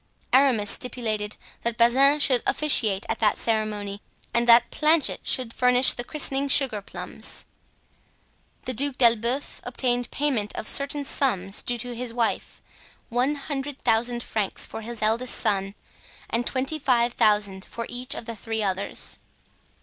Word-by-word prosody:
Aramis 250 Hz, -6 st, +3 dB
stipulated 215 Hz, -4 st, -2 dB, 0.2 s
that 235 Hz, 0 st, -3 dB
Bazin 270 Hz, +5 st, +4 dB
should 255 Hz, -4 st, +3 dB
officiate 220 Hz, -10 st, +2 dB
at -, -, -3 dB
that 210 Hz, -2 st, +2 dB
ceremony 210 Hz, -2 st, -3 dB, 0.3 s
and 235 Hz, 0 st, 0 dB
that 235 Hz, 0 st, +6 dB
Planchet 310 Hz, -1 st, +2 dB
should 245 Hz, -3 st, +1 dB
furnish 250 Hz, +1 st, +6 dB
the 245 Hz, -, -4 dB
christening 280 Hz, 0 st, -1 dB
sugar 265 Hz, -7 st, +3 dB
plums. -, -, -6 dB, 1.2 s
The 255 Hz, -, -3 dB
Duc 275 Hz, +2 st, -1 dB
d'Elbeuf 235 Hz, +3 st, +1 dB
obtained 245 Hz, -1 st, -2 dB
payment 260 Hz, -8 st, -2 dB
of -, -, -6 dB
certain 285 Hz, +1 st, +2 dB
sums 200 Hz, -9 st, -1 dB
due 245 Hz, -, -2 dB
to 245 Hz, +1 st, -5 dB
his 235 Hz, 0 st, -4 dB
wife, 235 Hz, -2 st, -3 dB, 0.5 s
one 250 Hz, +5 st, 0 dB
hundred 285 Hz, -1 st, -6 dB
thousand 235 Hz, +2 st, 0 dB
francs 210 Hz, -3 st, -3 dB
for 225 Hz, -, -8 dB
his 230 Hz, 0 st, -5 dB
eldest 230 Hz, +3 st, +1 dB
son 195 Hz, -2 st, -1 dB, 0.6 s
and 235 Hz, +1 st, -1 dB
twenty 270 Hz, +4 st, -1 dB
five 245 Hz, -3 st, +1 dB
thousand 210 Hz, -4 st, +1 dB
for 230 Hz, -, -7 dB
each 250 Hz, +2 st, -4 dB
of -, -, -7 dB
the 230 Hz, 0 st, -6 dB
three 220 Hz, +1 st, -4 dB
others. 195 Hz, 0 st, 0 dB
240 Hz, 145 wpm, -24 LUFS, 215-265 Hz, 1.2 s, that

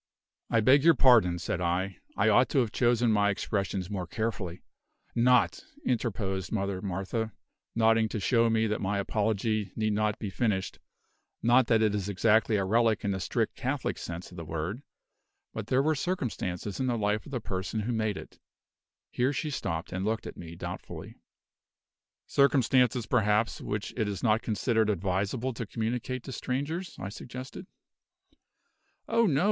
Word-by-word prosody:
"I 115 Hz, -, +3 dB
beg 135 Hz, +6 st, +5 dB
your 165 Hz, -1 st, +7 dB
pardon," 115 Hz, -10 st, +5 dB
said 90 Hz, +1 st, -3 dB
I; 90 Hz, +2 st, -1 dB, 0.2 s
"I 105 Hz, -, +3 dB
ought 110 Hz, +4 st, +5 dB
to -, -, -1 dB
have 120 Hz, -5 st, +2 dB
chosen 120 Hz, -1 st, +2 dB
my 105 Hz, -1 st, +3 dB
expressions 100 Hz, -2 st, -2 dB
more 95 Hz, -3 st, -4 dB
carefully 100 Hz, -4 st, -3 dB, 0.3 s
" -, -, -40 dB
"Not," 115 Hz, -9 st, +3 dB, 0.2 s
interposed 95 Hz, -7 st, -1 dB
Mother 100 Hz, -3 st, -1 dB
Martha, 100 Hz, +3 st, -3 dB, 0.4 s
nodding 115 Hz, -1 st, +4 dB
to 110 Hz, -, -3 dB
show 115 Hz, +3 st, +3 dB
me 110 Hz, 0 st, +2 dB
that 105 Hz, -1 st, -1 dB
my 100 Hz, +1 st, 0 dB
apology 105 Hz, 0 st, 0 dB
need 110 Hz, -1 st, 0 dB
not 105 Hz, 0 st, +1 dB
be 105 Hz, -3 st, -5 dB
finished 100 Hz, -3 st, -1 dB, 0.6 s
"not 120 Hz, +1 st, +5 dB
that 110 Hz, -2 st, +4 dB
it 105 Hz, -2 st, +2 dB
is 100 Hz, -1 st, -2 dB
exactly 110 Hz, +2 st, +3 dB
a 100 Hz, -2 st, +1 dB
relic 110 Hz, +1 st, +2 dB
in 100 Hz, -, +1 dB
the 95 Hz, -, -2 dB
strict 90 Hz, -, -1 dB
Catholic -, -, -2 dB
sense 85 Hz, +1 st, -6 dB
of 90 Hz, -, -12 dB
the 85 Hz, -, -5 dB
word; 80 Hz, -, -4 dB, 0.7 s
but -, -, -5 dB
there 130 Hz, +1 st, +3 dB
were 155 Hz, +2 st, +3 dB
circumstances 120 Hz, -, -3 dB
in 130 Hz, -, 0 dB
the 120 Hz, -2 st, +1 dB
life 105 Hz, 0 st, 0 dB
of -, -, -10 dB
the 130 Hz, -, -1 dB
person 95 Hz, +1 st, -3 dB
who 115 Hz, +4 st, -2 dB
made 110 Hz, -3 st, 0 dB
it -, -, -11 dB, 0.4 s
" -, -, -64 dB
Here 125 Hz, +3 st, +1 dB
she 150 Hz, +1 st, -2 dB
stopped, 80 Hz, -, -3 dB
and 95 Hz, +1 st, -2 dB
looked 110 Hz, +2 st, -1 dB
at -, -, -7 dB
me 85 Hz, -1 st, -9 dB
doubtfully. -, -, -7 dB, 1.1 s
"Circumstances, 130 Hz, -3 st, +3 dB
perhaps, 110 Hz, -2 st, +1 dB
which 105 Hz, 0 st, -4 dB
it 110 Hz, -4 st, 0 dB
is 100 Hz, -2 st, -4 dB
not 110 Hz, -1 st, +3 dB
considered 110 Hz, 0 st, +1 dB
advisable 100 Hz, +6 st, -1 dB
to 115 Hz, -1 st, -5 dB
communicate 120 Hz, +3 st, -3 dB
to -, -, -7 dB
strangers," 145 Hz, +9 st, -3 dB
I 95 Hz, -, -5 dB
suggested. 130 Hz, -, -8 dB, 1.4 s
"Oh, 230 Hz, -1 st, +3 dB
no!" 140 Hz, -5 st, +2 dB
110 Hz, 170 wpm, -29 LUFS, 100-120 Hz, 1.4 s, your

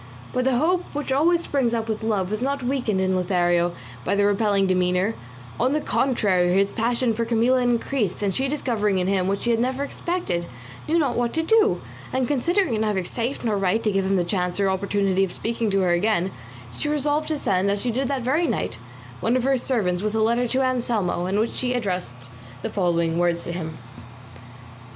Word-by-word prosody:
But 250 Hz, 0 st, 0 dB
the 265 Hz, -1 st, +3 dB
hope 355 Hz, +6 st, +2 dB
which 290 Hz, -2 st, -3 dB
always 335 Hz, +5 st, +3 dB
springs 255 Hz, -7 st, 0 dB
up 225 Hz, -1 st, -2 dB
with 220 Hz, 0 st, -2 dB
love 205 Hz, -4 st, -1 dB
was 215 Hz, +2 st, -2 dB
not 275 Hz, +1 st, -1 dB
weakened 245 Hz, -6 st, 0 dB
in 190 Hz, 0 st, +1 dB
Lothario 175 Hz, -1 st, +1 dB, 0.3 s
by 200 Hz, -, 0 dB
this 200 Hz, 0 st, +3 dB
repelling 205 Hz, -1 st, +2 dB
demeanour; 185 Hz, +2 st, +1 dB, 0.5 s
on 255 Hz, +4 st, +2 dB
the 305 Hz, -, +2 dB
contrary 200 Hz, -12 st, +1 dB
his 195 Hz, +2 st, +3 dB
passion 235 Hz, +1 st, 0 dB
for 230 Hz, +2 st, -1 dB
Camilla 235 Hz, +3 st, +2 dB
increased, 240 Hz, -4 st, 0 dB
and 195 Hz, -2 st, +1 dB
she 265 Hz, +6 st, 0 dB
discovering 225 Hz, -8 st, 0 dB
in 180 Hz, -, +1 dB
him 190 Hz, -1 st, +1 dB
what 200 Hz, +1 st, -1 dB
she 240 Hz, -, +1 dB
had 230 Hz, -, +2 dB
never 260 Hz, +3 st, 0 dB
expected, 285 Hz, -, -3 dB, 0.4 s
knew 325 Hz, -, +2 dB
not 280 Hz, -7 st, +1 dB
what 240 Hz, -1 st, 0 dB
to 320 Hz, -, 0 dB
do; 435 Hz, +4 st, +3 dB, 0.3 s
and 260 Hz, -1 st, 0 dB
considering 335 Hz, -, +1 dB
it 215 Hz, -, 0 dB
neither 210 Hz, -4 st, 0 dB
safe 235 Hz, +8 st, -3 dB
nor 220 Hz, -2 st, +1 dB
right 195 Hz, +3 st, +1 dB
to 215 Hz, -, +2 dB
give 195 Hz, -1 st, +1 dB
him 195 Hz, +1 st, +1 dB
the 180 Hz, -, +2 dB
chance 180 Hz, +1 st, -2 dB
or 195 Hz, -1 st, +2 dB
opportunity 195 Hz, 0 st, +1 dB
of 190 Hz, -, -1 dB
speaking 230 Hz, -1 st, -2 dB
to 195 Hz, -1 st, +2 dB
her 180 Hz, -2 st, +2 dB
again, 190 Hz, +1 st, +1 dB, 0.4 s
she 295 Hz, -, -3 dB
resolved 295 Hz, +1 st, 0 dB
to 310 Hz, -, 0 dB
send, 195 Hz, -6 st, +1 dB
as 200 Hz, 0 st, 0 dB
she 245 Hz, +3 st, -1 dB
did 260 Hz, +3 st, -1 dB
that 270 Hz, -2 st, -2 dB
very 300 Hz, +7 st, +1 dB
night, 115 Hz, -, -2 dB, 0.4 s
one 235 Hz, +3 st, +1 dB
of 250 Hz, -, -1 dB
her 270 Hz, +1 st, +3 dB
servants 210 Hz, -9 st, 0 dB
with 215 Hz, +1 st, -2 dB
a 220 Hz, -, +2 dB
letter 235 Hz, +2 st, +2 dB
to 260 Hz, +3 st, +1 dB
Anselmo, 235 Hz, -8 st, 0 dB
in 195 Hz, +2 st, 0 dB
which 225 Hz, +2 st, 0 dB
she 250 Hz, -1 st, -1 dB
addressed 180 Hz, -, -4 dB, 0.3 s
the -, -, -2 dB
following 170 Hz, -3 st, 0 dB
words 175 Hz, -1 st, +1 dB
to -, -, -4 dB
him. 160 Hz, -2 st, -5 dB
220 Hz, 210 wpm, -23 LUFS, 190-255 Hz, 0.5 s, the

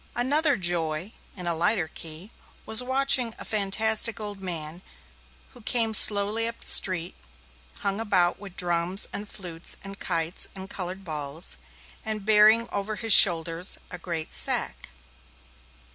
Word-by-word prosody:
Another 285 Hz, +5 st, +1 dB
joy, 170 Hz, 0 st, -2 dB, 0.3 s
in 180 Hz, -, -7 dB
a 170 Hz, -, -1 dB
lighter 170 Hz, +1 st, -1 dB
key, 165 Hz, +6 st, -8 dB, 0.3 s
was 220 Hz, +2 st, +1 dB
watching 260 Hz, -2 st, +1 dB
a -, -, -10 dB
fantastic 220 Hz, +2 st, 0 dB
old 205 Hz, -2 st, -7 dB
man 170 Hz, -2 st, -5 dB, 0.7 s
who 245 Hz, -, -15 dB
came 225 Hz, 0 st, 0 dB
slowly 210 Hz, +2 st, +4 dB
up 230 Hz, -, -5 dB
the -, -, -11 dB
street, 180 Hz, -2 st, +4 dB, 0.7 s
hung 200 Hz, 0 st, -2 dB
about 185 Hz, -6 st, 0 dB
with 195 Hz, -3 st, -12 dB
drums 175 Hz, +2 st, -1 dB
and 205 Hz, 0 st, -6 dB
flutes 175 Hz, -4 st, -4 dB
and 195 Hz, +1 st, -8 dB
kites 165 Hz, +1 st, -1 dB
and 190 Hz, 0 st, -9 dB
coloured 185 Hz, +1 st, -6 dB
balls, 150 Hz, 0 st, -1 dB, 0.5 s
and 215 Hz, -3 st, -5 dB
bearing 215 Hz, +2 st, +4 dB
over 205 Hz, +2 st, -4 dB
his 225 Hz, -1 st, +1 dB
shoulders 170 Hz, -1 st, +6 dB
a -, -, -8 dB
great 165 Hz, -3 st, -6 dB
sack. 60 Hz, -2 st, 0 dB
195 Hz, 140 wpm, -24 LUFS, 170-220 Hz, 0.7 s, shoulders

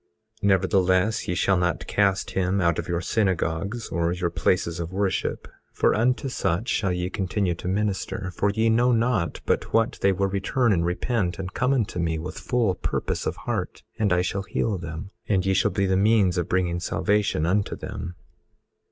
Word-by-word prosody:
18:32 100 Hz, -, -1 dB
Nevertheless, 95 Hz, +2 st, +2 dB
ye 90 Hz, -, -1 dB
shall 95 Hz, +2 st, +2 dB
not 90 Hz, -1 st, 0 dB
cast 100 Hz, -2 st, +1 dB
him 95 Hz, +1 st, 0 dB
out 85 Hz, -3 st, +2 dB
of -, -, -4 dB
your 85 Hz, 0 st, -1 dB
synagogues, 100 Hz, +2 st, -1 dB
or 85 Hz, +1 st, 0 dB
your 90 Hz, -1 st, -1 dB
places 85 Hz, -1 st, 0 dB
of 85 Hz, +1 st, -4 dB
worship, 95 Hz, -1 st, -1 dB, 0.2 s
for -, -, +2 dB
unto 125 Hz, +5 st, +1 dB
such 110 Hz, -4 st, -1 dB
shall 95 Hz, -4 st, +1 dB
ye 90 Hz, 0 st, -1 dB
continue 95 Hz, -1 st, -1 dB
to 85 Hz, -, -7 dB
minister; 100 Hz, 0 st, -2 dB
for 100 Hz, -, +1 dB
ye 110 Hz, +3 st, +1 dB
know 120 Hz, +3 st, +4 dB
not 115 Hz, -, +1 dB
but -, -, 0 dB
what 115 Hz, +1 st, +2 dB
they 100 Hz, -, +4 dB
will 95 Hz, +1 st, 0 dB
return 100 Hz, +5 st, +1 dB
and 85 Hz, -2 st, +1 dB
repent, 90 Hz, +1 st, -1 dB
and 95 Hz, -2 st, -5 dB
come 130 Hz, +1 st, +1 dB
unto 115 Hz, -9 st, 0 dB
me 80 Hz, -1 st, 0 dB
with 85 Hz, +3 st, -6 dB
full 120 Hz, -6 st, +1 dB
purpose -, -, -2 dB
of -, -, -1 dB
heart, -, -, -3 dB, 0.2 s
and 105 Hz, -3 st, +2 dB
I 90 Hz, 0 st, +3 dB
shall 95 Hz, +2 st, -2 dB
heal 100 Hz, 0 st, -1 dB
them; 85 Hz, +3 st, -7 dB, 0.2 s
and 95 Hz, -3 st, +2 dB
ye 95 Hz, -, +2 dB
shall -, -, +3 dB
be 100 Hz, -, 0 dB
the 95 Hz, 0 st, +2 dB
means 100 Hz, -3 st, +3 dB
of 85 Hz, -, -3 dB
bringing 90 Hz, -2 st, +1 dB
salvation 100 Hz, -2 st, 0 dB
unto 100 Hz, +4 st, +1 dB
them. 95 Hz, -4 st, -6 dB
95 Hz, 190 wpm, -25 LUFS, 90-105 Hz, 0.2 s, know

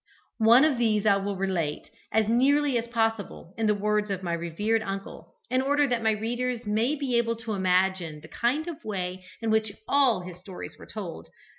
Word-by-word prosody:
One 230 Hz, +5 st, +7 dB
of 285 Hz, -6 st, +1 dB
these 215 Hz, -3 st, +2 dB
I 200 Hz, -2 st, +5 dB
will 200 Hz, 0 st, -2 dB
relate, 180 Hz, -6 st, -2 dB, 0.2 s
as 220 Hz, 0 st, +2 dB
nearly 275 Hz, +4 st, +3 dB
as 235 Hz, 0 st, 0 dB
possible 225 Hz, -6 st, -2 dB
in 225 Hz, -1 st, 0 dB
the 210 Hz, -, +3 dB
words 210 Hz, +1 st, 0 dB
of 190 Hz, -1 st, -3 dB
my 170 Hz, -2 st, -1 dB
revered 170 Hz, +7 st, 0 dB
uncle, 195 Hz, -1 st, -7 dB, 0.2 s
in 255 Hz, +1 st, +3 dB
order 285 Hz, +2 st, +3 dB
that 245 Hz, -4 st, 0 dB
my 220 Hz, -, +3 dB
readers 240 Hz, +3 st, -2 dB
may 220 Hz, +7 st, +1 dB
be 265 Hz, -5 st, +1 dB
able 230 Hz, -1 st, 0 dB
to 225 Hz, -1 st, -5 dB
imagine 185 Hz, -4 st, +1 dB
the 160 Hz, -, -12 dB
kind 255 Hz, -, -1 dB
of 330 Hz, -2 st, -7 dB
way 185 Hz, -3 st, -4 dB, 0.2 s
in 225 Hz, -, +1 dB
which 220 Hz, -1 st, +2 dB, 0.2 s
all 265 Hz, -9 st, +3 dB
his 180 Hz, -1 st, -9 dB
stories 185 Hz, 0 st, -9 dB
were -, -, -12 dB
told. 195 Hz, -6 st, -7 dB
220 Hz, 195 wpm, -27 LUFS, 190-240 Hz, 0.2 s, One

